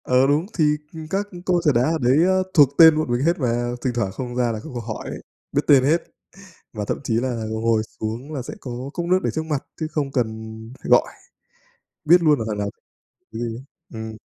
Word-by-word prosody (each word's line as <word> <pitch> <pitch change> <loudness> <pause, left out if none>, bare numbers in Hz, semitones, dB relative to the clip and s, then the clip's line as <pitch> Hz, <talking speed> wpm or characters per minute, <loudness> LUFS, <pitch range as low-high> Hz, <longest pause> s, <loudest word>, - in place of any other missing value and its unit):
Ờ, 130 +1 +3
đúng, 150 +4 +2
thì, 160 - +3 0.3
ừm, 160 -1 -8
các 200 +3 -1 0.2
cô 180 -1 +3
trà 150 - +4
đá 120 - +2
ở 160 +5 +1
đấy, 130 +7 +4
a, 190 - +3 0.2
thuộc 145 -5 +7
tên 160 -2 +8
bọn 155 -5 -1
mình 120 +1 +1
hết 170 +1 +2
mà, 120 -2 0
thỉnh 130 - 0
thoảng 105 -5 -1
không 120 +3 -6
ra 125 -2 +1
là 110 - -4
các 155 - -10
cô 120 - -3
hỏi 115 -1 -6
ấy, - - -7 0.3
biết 145 - +1
tên 140 -3 +6
hết. 160 +5 +2 0.7
Và 105 -2 -4
thậm - - -2
chí 120 - -1
là 120 -3 -2
ngồi 110 0 +1 0.2
xuống 115 +7 -4
là 140 - -3
sẽ 125 - -7
có 130 - -7 0.2
cốc 175 - -3
nước 185 +2 +3
để - - +1
trước 160 - -2
mặt 150 -4 -2 0.2
chứ 160 - -2
không 145 -3 -2
cần 125 -4 +1 0.6
phải - - -5
gọi, - - +5 1.0
biết 175 +3 +6
luôn 150 -3 +4
là 115 - -2
thằng 105 -1 -3
nào 100 0 -2 0.6
gì 110 - -6
ấy. 120 +1 -4 0.3
Ừm. 110 -1 -6
130 Hz, 235 wpm, -22 LUFS, 115-155 Hz, 1.0 s, tên